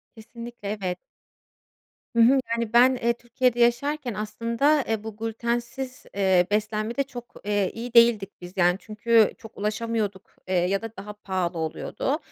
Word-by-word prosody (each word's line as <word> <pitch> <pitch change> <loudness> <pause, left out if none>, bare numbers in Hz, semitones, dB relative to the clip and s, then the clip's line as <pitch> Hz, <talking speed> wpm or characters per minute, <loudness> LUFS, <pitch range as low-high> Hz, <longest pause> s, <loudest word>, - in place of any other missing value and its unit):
Kesinlikle, 235 -1 -9
evet. 190 -4 -3 1.2
Hı 235 - +3
hı. 265 +4 +6
Yani, 230 -1 -1
ben, 250 +2 +6
eee, 235 -1 +1
Türkiye'de 240 +1 0
yaşarken, 245 +2 +1
aslında, 230 +8 +1
eee, 220 -1 -1
bu 220 -2 -7
glütensiz, 235 +3 -3
eee, 190 -3 +4
beslenmede 215 +4 0
çok, 245 -3 -10
eee, 205 -2 +1
iyi 235 +1 -6
değildik 230 -4 +4
biz, 175 0 -9
yani, 175 -1 +4
çünkü 220 0 +3
çok 225 -3 -13
ulaşamıyorduk, 210 -1 -2
eee, 190 - 0
ya 180 +3 +1
da 225 0 -7
daha 200 +2 -7
pahalı 185 -4 -3
oluyordu. 160 - -2
225 Hz, 145 wpm, -25 LUFS, 205-240 Hz, 1.2 s, hı